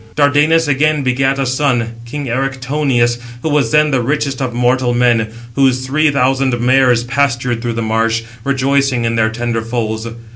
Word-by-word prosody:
Dardanus 150 +3 +3
again 150 +1 +1
begat 135 +1 +1
a 135 - -1
son, 125 -3 0
king 145 +4 -5
Erichthonius, 130 -1 -1 0.2
who 160 - -1
was 145 -1 +1
then 150 0 +3
the 130 -2 +1
richest 140 +1 -2
of 130 -2 -2
mortal 125 +1 +1
men; 120 -2 +2 0.3
whose 130 0 +1
three 155 +4 +2
thousand 135 -2 +1
mares 125 -1 +3
pastured 125 -2 -1
through 120 -1 -2
the 115 0 -3
marsh, 115 +1 0 0.2
rejoicing 135 -2 0
in 115 - 0
their 110 -1 +2
tender 115 0 -3
foals. 115 -1 -3
130 Hz, 160 wpm, -15 LUFS, 120-140 Hz, 0.3 s, Dardanus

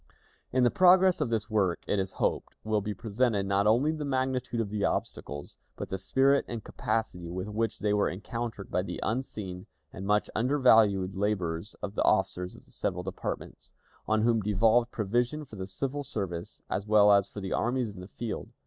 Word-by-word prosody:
In 130 0 +3
the 120 - +4
progress 185 -1 +5
of 140 - 0
this 110 -2 -1
work, 100 -6 0
it 100 - 0
is 95 -1 -2
hoped, - - -1
will 110 -1 +1
be 105 +1 -3
presented 105 0 0
not 100 +1 +2
only 125 +8 +4
the 155 -1 -4
magnitude 130 -3 -1
of 105 -3 -2
the 105 -1 -1
obstacles, 70 0 -3 0.2
but - - -6
the 95 - -3
spirit 135 +8 +3
and 115 -3 -5
capacity 90 -7 -3
with 90 +3 -4
which 110 +2 -1
they 105 -1 0
were 105 - +2
encountered 110 +2 -5
by 90 - +1
the 95 - -5
unseen 105 -7 -4 0.3
and 95 +2 -6
much 105 0 +2
undervalued 110 -7 +4
labors 95 -2 -2
of 100 -1 -3
the - - -1
officers 95 -3 +1
of - - -16
the - - -22
several 90 0 -2
departments, 95 +1 -6 0.3
on 110 0 +2
whom 115 -1 +3
devolved 110 +4 +3
provision 120 +8 -1
for 120 - -12
the 95 -2 -5
civil 135 +8 -3
service, 90 -9 -5
as 100 +2 -3
well 105 -1 +6
as 100 -1 +4
for - - -7
the 95 -1 -3
armies 120 -3 0
in 95 - -11
the 90 - -8
field. 115 +1 -5
105 Hz, 195 wpm, -29 LUFS, 95-120 Hz, 0.3 s, well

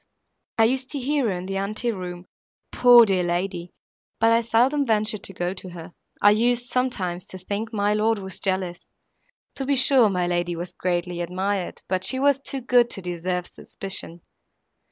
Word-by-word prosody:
I 225 - +5
used 260 +3 +1
to 285 - -2
hear 280 +1 0
her - - 0
in 180 0 -4
the 195 +1 -3
ante 215 +5 -1
room, 180 -3 -7 0.5
poor 245 -1 +7
dear 190 -3 +1
lady! 175 0 -2 0.5
but 225 0 +4
I 230 - +4
seldom 245 +6 +2
ventured 215 -3 0
to 195 - -6
go 175 0 -2
to 185 -1 -10
her. 170 0 -10 0.3
I 205 - +6
used, 240 +3 +2
sometimes, 190 -9 -1
to 185 - -8
think 205 +4 -4
my 205 -1 +1
lord 220 +1 +1
was 190 -2 -6
jealous. 185 -2 -3 0.6
To 270 - -3
be 280 - +2
sure 260 -3 +5
my 180 -2 0
lady 175 0 -1
was 175 +2 -6
greatly 175 -1 -2
admired, 185 +2 -3
but 185 0 -1
she 260 +8 0
was 280 0 +3
too 275 -1 -5
good 245 -1 +3
to 195 - -5
deserve 180 0 -3
suspicion. 180 -3 -6
195 Hz, 180 wpm, -24 LUFS, 180-235 Hz, 0.6 s, poor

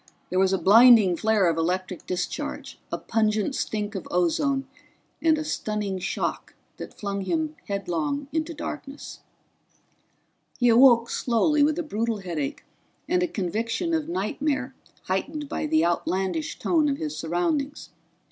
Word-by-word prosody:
There 185 - +1
was 190 0 +3
a 190 - +2
blinding 220 -2 +7
flare 215 0 +2
of 165 -1 +1
electric 180 +2 -2
discharge, 180 - -4
a - - -1
pungent 215 +2 0
stink 210 -4 -3
of 195 - -6
ozone 270 - +1 0.5
and 320 0 +4
a 310 - -2
stunning 210 -9 -3
shock - - -3 0.2
that - - -9
flung 200 -1 -3
him 315 - -1
headlong 200 - -2
into 320 +1 -1
darkness. 290 -1 -7 1.4
He 245 -1 +3
awoke 235 0 +6
slowly 290 +6 +2
with 300 +2 +3
a 345 - -1
brutal 230 -5 -2
headache 160 -7 -4 0.4
and 360 0 +2
a 355 - +2
conviction 230 - -2
of 320 -1 -1
nightmare 290 -6 -2 0.3
heightened 290 +11 -3
by 305 - -3
the 315 +1 +3
outlandish 190 - -1
tone 310 -4 +2
of 275 - -1
his 155 -1 -4
surroundings. 275 - -2
230 Hz, 140 wpm, -25 LUFS, 190-295 Hz, 1.4 s, blinding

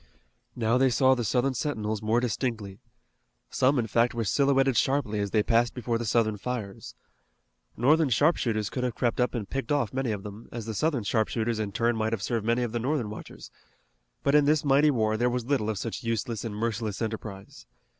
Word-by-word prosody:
Now 115 +1 +1
they 135 0 +4
saw 130 +1 +4
the 125 -2 -1
Southern 125 +4 +1
sentinels 110 -5 -2
more 110 +2 +2
distinctly. 115 -4 -3 0.7
Some, 135 +2 +2
in 120 - +1
fact, 115 +2 +1
were 115 - -1
silhouetted 135 +3 +2
sharply 125 -4 +1
as 100 0 -1
they 105 +1 +2
passed 120 +1 +2
before 120 -2 -2
the 120 - -3
Southern 110 -1 +1
fires. 110 -3 -6 0.8
Northern 150 +5 +3
sharpshooters 115 -6 +1
could 125 - -3
have 125 -2 -2
crept 120 0 0
up 125 - 0
and 110 -4 -3
picked 135 +5 -4
off 140 -8 0
many 130 -3 -1
of 100 -2 -4
them, 105 +2 -10
as 115 -2 -6
the 110 - -4
Southern 140 +1 0
sharpshooters 110 +1 0
in 105 -2 -2
turn 120 +3 +1
might 110 0 -1
have 105 -3 -3
served 115 -1 -2
many 120 +1 +2
of 120 - -3
the 120 - -2
Northern 125 -3 -1
watchers, 110 - -10 0.7
but 140 - +2
in 150 -1 +5
this 150 0 +2
mighty 140 +2 +4
war 110 -5 +1
there 120 +2 +2
was 125 -1 -2
little 130 -5 0
of 110 - -2
such 115 +3 -4
useless 115 0 -2
and 110 -3 -5
merciless 110 -1 -2
enterprise. 110 -3 -6
115 Hz, 205 wpm, -27 LUFS, 110-130 Hz, 0.8 s, in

